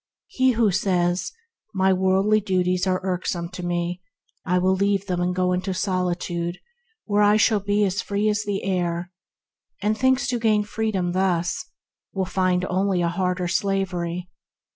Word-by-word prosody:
He 260 -1 +2
who 225 -3 +3
says, 180 -2 0 0.4
"My 190 0 +3
worldly 190 +3 +3
duties 185 -1 0
are 185 0 +1
irksome 180 -2 -2
to 180 0 -8
me; 175 +1 -2 0.4
I 180 0 +1
will 185 +1 +3
leave 200 0 +1
them 180 -2 -2
and 180 0 0
go 180 0 +1
into 185 +1 -2
solitude, 175 -2 -2 0.5
where 205 -1 +2
I 210 +1 +5
shall 215 0 +3
be 205 +1 +1
as 195 0 -1
free 205 +1 -1
as 210 0 +1
the 205 -2 -3
air," 175 -2 -1 0.7
thinking 220 +6 +2
to 255 -2 -2
gain 215 -2 +2
freedom 205 -4 -1
thus, 185 - 0 0.5
will 190 -1 -1
find 185 0 +1
only 185 -1 0
a 170 - +1
harder 180 0 -1
slavery. 180 -2 -1
185 Hz, 155 wpm, -23 LUFS, 180-205 Hz, 0.7 s, I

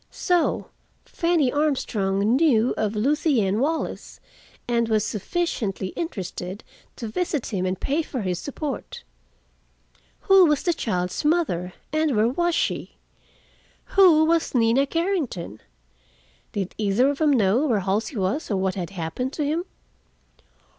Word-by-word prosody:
So 355 -2 0 0.4
Fanny 335 -7 +1
Armstrong 220 -8 +1
knew 260 -6 +3
of 215 0 -1
Lucien 230 - +1
Wallace, 315 +5 -2 0.5
and 235 -1 +1
was 215 -1 +2
sufficiently 215 - -2
interested 190 - -5 0.3
to 230 - -6
visit 285 0 -2
him 185 -1 0
and 185 0 -2
pay 290 +4 0
for 265 -5 -5
his 180 -2 -2
support. 285 0 -6 1.2
Who 385 -2 +6
was 300 -2 +1
the 345 - +2
child's 180 - -2
mother 295 - 0 0.2
and 310 -4 +1
where 215 +2 +3
was 345 +6 0
she? - - -2 1.0
Who 345 -7 +6
was 330 -3 +1
Nina 240 +4 +3
Carrington? 315 - -2 0.9
Did 195 -2 -3
either 215 +6 +3
of 285 - -6
them 310 -2 +3
know 235 +4 +3
where 220 -7 +1
Halsey 210 +6 -1
was 195 +10 -1
or 200 - 0
what 190 0 0
had 180 -3 -4
happened 195 - -4
to 300 - -2
him? 320 +5 -1
245 Hz, 135 wpm, -24 LUFS, 195-310 Hz, 1.2 s, Who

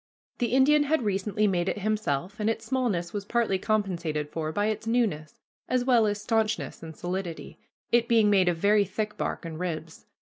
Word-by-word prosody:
The 240 - +1
Indian 275 +5 +4
had 300 -2 +1
recently 205 +1 0
made 185 -2 +1
it - - -2
himself, 205 -3 -2
and 215 +1 +1
its 225 0 -3
smallness 225 -9 -1
was 205 -1 -3
partly 215 -3 0
compensated 170 -9 -1
for 155 -1 -3
by 205 +5 0
its 220 +1 -2
newness, 205 -11 -1 0.3
as 250 -1 +1
well 240 -4 +4
as 205 0 -1
stanchness 220 0 -1
and 160 -2 -9
solidity, 175 -1 -5 0.3
it 235 0 +3
being 225 -3 +4
made 190 -3 +4
of 175 - -1
very 205 +4 +4
thick 210 +2 -4
bark - - -3
and 160 -1 -6
ribs. 165 -2 -5
205 Hz, 190 wpm, -27 LUFS, 175-225 Hz, 0.3 s, Indian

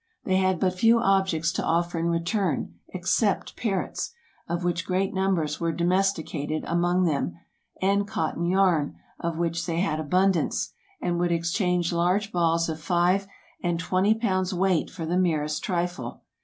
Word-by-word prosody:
They 185 -1 +2
had 185 -2 +2
but 185 -1 +2
few 225 +5 +4
objects 190 -6 +2
to 185 - -2
offer 170 +1 0
in 165 - 0
return, 170 +2 0 0.2
except 190 +3 0
parrots, 205 - -2 0.3
of 170 +1 -2
which 175 -1 0
great 190 +1 0
numbers 185 -6 0
were 165 -1 0
domesticated 170 -4 0
among 175 +2 +2
them, 140 - 0 0.5
and 200 +1 +2
cotton 170 -3 -1
yarn, 180 -5 +2 0.2
of 170 -1 -2
which 170 +1 -1
they 165 -1 -1
had 165 -4 0
abundance, 180 +3 +1 0.3
and 175 -1 0
would 175 0 +1
exchange 170 +1 +1
large 180 +5 +1
balls 165 -1 +2
of 160 -1 -4
five 180 +3 +2 0.3
and 175 -1 0
twenty 185 +6 +2
pounds' 190 -4 0
weight 185 -2 +1
for 170 -3 -6
the 175 +3 +1
merest 155 -4 0
trifle. 175 -1 -3
175 Hz, 155 wpm, -26 LUFS, 165-190 Hz, 0.5 s, few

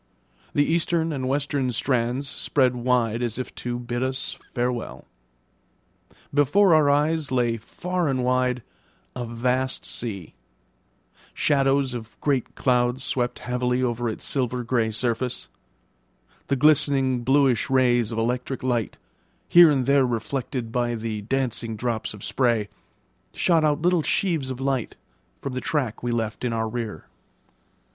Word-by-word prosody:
The 145 - +4
eastern 165 0 +1
and 130 -2 -3
western 140 -2 0
strands 125 +2 0
spread 130 -2 +1
wide 120 -2 +1
as 120 -2 -2
if 130 - -5
to 120 0 -3
bid 120 0 -4
us 130 +1 -3 0.2
farewell. 120 -1 -2 1.3
Before 165 +7 +4
our 155 -2 +5
eyes 150 0 +1
lay 120 -2 +1
far 175 +8 -3
and 130 -2 0
wide 125 -1 +1 0.5
a 125 -1 -3
vast 125 +3 -1
sea; 100 -8 -5 1.0
shadows 135 -2 +2
of 115 -2 -8
great 135 -5 -1
clouds 125 0 +1
swept 125 -1 -1
heavily 125 +1 -1
over 120 -1 -1
its 110 - -6
silver 125 -2 -1
grey 115 -1 +1
surface; 120 +2 -2 1.0
the 140 - +1
glistening 135 -3 +3
bluish 135 -2 +3
rays 120 -4 +3
of 115 - -4
electric 125 +3 -2
light, 120 -5 -1 0.5
here 175 -1 +8
and 135 -4 +1
there 140 -1 +4
reflected 120 0 -3
by 120 0 0
the 110 -2 -4
dancing 115 -1 -2
drops 110 -1 -3
of 100 - -12
spray, 115 -5 +1 0.7
shot 165 -3 +3
out 150 +1 +1
little 180 -1 +3
sheaves 160 -5 0
of 130 -1 -5
light 135 -3 -2 0.5
from 140 - -3
the 130 - -3
track 130 -4 -2
we 120 - -2
left 110 -1 -2
in 120 -2 0
our 115 0 -1
rear. 110 -8 -5
125 Hz, 140 wpm, -24 LUFS, 120-140 Hz, 1.3 s, here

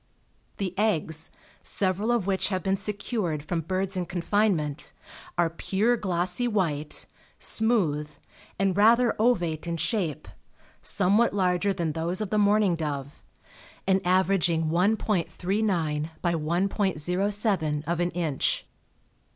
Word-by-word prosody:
The 190 -3 -2
eggs, 160 -7 +1 0.3
several 200 +4 0
of 235 -6 +1
which 190 -1 +1
have 185 -3 -2
been 195 0 +1
secured 200 -6 -2
from 170 +1 -1
birds 190 +3 -2
in 180 -2 -2
confinement, 175 -4 0 0.4
are 175 -1 +3
pure 200 +8 0
glossy 185 +2 0
white, 155 -9 -1 0.3
smooth, 180 -11 +1 0.5
and 195 -1 +1
rather 230 +3 +5
ovate 175 -9 +1
in 170 0 -2
shape, 170 - -1 0.5
somewhat 205 +4 +2
larger 185 +1 +2
than 170 -4 -1
those 165 +3 -2
of 215 -3 -3
the 215 - +2
mourning 205 -3 +3
dove, 145 -3 -5 0.6
and 190 0 +2
averaging 180 -3 +2
1.39 195 +1 +1 0.9
× 170 +2 +1 0.3
1.07 180 -2 0
of 170 +2 -1
an 175 0 +1
inch. 165 -6 -1
185 Hz, 120 wpm, -26 LUFS, 165-205 Hz, 0.9 s, rather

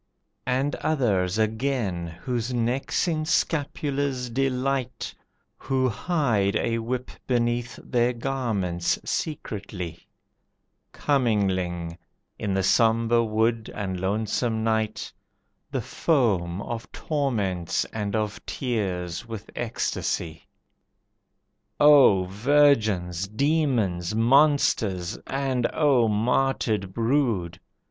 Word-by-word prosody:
And 130 +3 +1
others 105 -11 +1
again, 110 -5 -1
whose 115 +8 -3
necks 125 +7 0
in 155 -2 0
scapulars 140 -5 -1
delight, 130 0 -1 0.4
Who 130 -1 0
hide 115 - 0
a 115 +1 0
whip 125 +2 -3 0.2
beneath 120 0 0
their 120 -1 +1
garments 115 -9 -1
secretly, 100 - -4 0.8
Commingling, 95 - 0 0.4
in 100 -3 -1
the 95 - +1
sombre 115 +3 +3
wood 110 +1 0
and 95 -3 -3
lonesome 110 +4 -1
night, 110 -1 -1 0.6
The - - -2
foam 100 - +1
of 115 -1 -6
torments 105 - -1
and 105 -2 -2
of 105 -1 -2
tears 95 -7 -3
with 110 -2 -8
ecstasy. 85 -8 -3 1.3
O 140 -10 +7
virgins, 105 - +2
demons, 110 - 0
monsters, 115 - +3
and 135 -3 0
O 135 -7 +3
martyred 110 -2 +1
brood! 115 - 0
115 Hz, 90 wpm, -25 LUFS, 95-130 Hz, 1.3 s, O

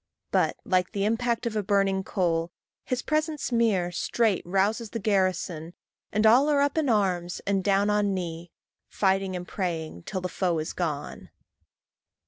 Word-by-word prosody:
But, - - +2
like 180 -1 +1
the 200 0 0
impact 235 +2 0
of 230 -2 -2
a 210 - +1
burning 195 -1 +1
coal, 170 -3 0 0.3
His 255 -1 -2
presence 310 -2 -1
mere 215 -7 +2
straight 210 +2 +1
rouses 205 +5 +1
the 230 - -4
garrison, 185 -5 0 0.4
And 215 +2 +1
all 250 +7 +6
are 290 -1 +3
up 285 0 +2
in 310 -4 +1
arms, 180 -5 +1
and 195 -1 +1
down 200 +2 +2
on 210 -1 +2
knee, 170 -1 -5 0.4
Fighting 190 -1 0
and 180 0 -5
praying 165 - -3
till 185 - -3
the 185 - -2
foe 180 -2 -1
is 155 +2 -3
gone. 155 -5 -4
195 Hz, 160 wpm, -27 LUFS, 180-220 Hz, 0.4 s, all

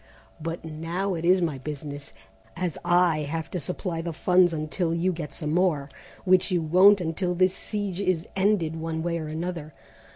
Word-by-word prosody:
But 165 +1 -4
now 165 +5 -3
it 165 -1 -4
is 180 +1 +4
my 150 -5 -1
business, 145 0 -7 0.4
as 180 -3 -2
I 175 -2 +3
have 155 +2 -4
to 180 - -2
supply 170 +1 -3
the 170 0 -4
funds 180 +2 +4
until 165 +2 -1
you 180 +2 +1
get 155 -4 -6
some 150 +1 -3
more, 160 -6 +1 0.3
which 185 0 +4
you 180 - +2
won't 185 +6 +6
until 180 +1 -1
the 185 +1 +5
siege 200 0 -4
is 185 -4 0
ended 190 -5 +2
one 160 0 -3
way 170 -1 -1
or 155 - -5
another. 160 -1 -5
170 Hz, 175 wpm, -26 LUFS, 160-185 Hz, 0.4 s, won't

